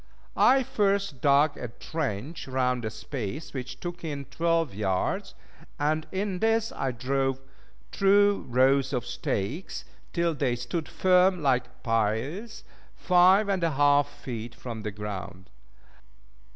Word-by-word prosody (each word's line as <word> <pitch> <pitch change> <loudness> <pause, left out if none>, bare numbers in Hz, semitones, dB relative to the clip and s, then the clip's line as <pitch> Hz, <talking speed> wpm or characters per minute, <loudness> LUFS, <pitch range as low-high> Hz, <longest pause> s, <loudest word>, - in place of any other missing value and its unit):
I 265 +1 +5
first 200 - 0
dug 145 +1 +4
a 125 - -5
trench 135 +2 -4
round 125 -2 0
a - - -1
space 130 +5 -6
which 130 -1 -6
took 175 0 -6
in 145 -3 -4
twelve 165 -4 0
yards; 95 -2 -1 0.4
and 155 +2 0
in 190 -1 -2
this 225 +1 +2
I 135 - -2
drove 135 +2 -1 0.5
two 200 +1 +3
rows 130 +2 +3
of 125 -2 -1
stakes, 125 - -3 0.3
till 170 -1 +1
they 135 -4 0
stood 125 +7 -4
firm 185 -2 +3
like 125 -3 0
piles, 115 - -1 0.3
five 185 +3 +5
and 195 -3 0
a 165 -2 +1
half 145 0 +4
feet 115 -4 -7
from 115 -3 -7
the 105 - -3
ground. 100 -4 -7
140 Hz, 130 wpm, -27 LUFS, 120-175 Hz, 0.5 s, I